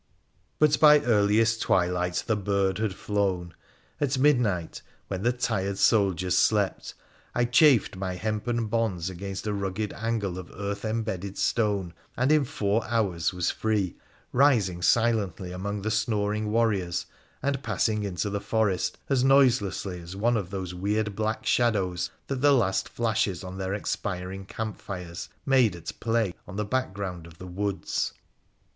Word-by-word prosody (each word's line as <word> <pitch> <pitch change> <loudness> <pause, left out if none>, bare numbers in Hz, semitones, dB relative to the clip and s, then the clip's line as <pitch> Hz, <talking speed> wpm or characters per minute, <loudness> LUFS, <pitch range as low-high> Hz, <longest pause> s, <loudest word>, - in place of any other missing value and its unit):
But 150 -1 +4
by 150 -1 +8
earliest 110 -1 +3
twilight 90 -1 +1
the 110 - +1
bird 100 -1 0
had 110 -3 -1
flown! 95 -5 -1 0.5
At 140 -2 0
midnight, 120 - +2 0.3
when 95 -1 -3
the 120 +4 +2
tired 100 -5 -1
soldiers 95 -3 +3
slept, 105 -3 +1 0.4
I 120 - +3
chafed 120 -3 +4
my 95 -1 -3
hempen 110 +4 -1
bonds 105 -6 -1
against 95 +2 -6
a 105 - -1
rugged 100 +1 -3
angle 110 -5 -2
of 90 - -9
earth 100 +1 -4
embedded 110 -4 -3
stone, 100 -6 0 0.2
and 130 +4 +2
in 155 -2 +4
four 105 -1 0
hours 100 -8 0
was 90 -2 0
free, 105 -5 -1 0.4
rising 115 -10 +3
silently 100 -3 +1
among 100 +2 -4
the 110 - -1
snoring 105 -1 0
warriors, 105 -6 +1 0.4
and 140 -1 0
passing 110 -5 0
into 100 +1 -2
the 100 0 -2
forest 105 -5 0
as 135 -3 +2
noiselessly 120 -9 +3
as 85 +2 -9
one 120 +4 +2
of 100 -5 -2
those 95 -2 -5
weird 105 +3 -1
black 110 +1 -2
shadows 100 -7 +1 0.2
that 135 -2 -3
the 145 0 +6
last 95 -7 +1
flashes 110 -5 -1
of 95 0 -7
their 95 +1 -2
expiring 95 -1 -4
camp 110 +1 -5
fires 85 -4 -6 0.2
made 130 -8 +4
at 85 - -6
play 115 -4 0
on 95 - -8
the 105 +1 -1
background 100 -7 -3
of 80 -1 -15
the 90 - -9
woods. 100 +2 -2
100 Hz, 150 wpm, -27 LUFS, 95-115 Hz, 0.5 s, by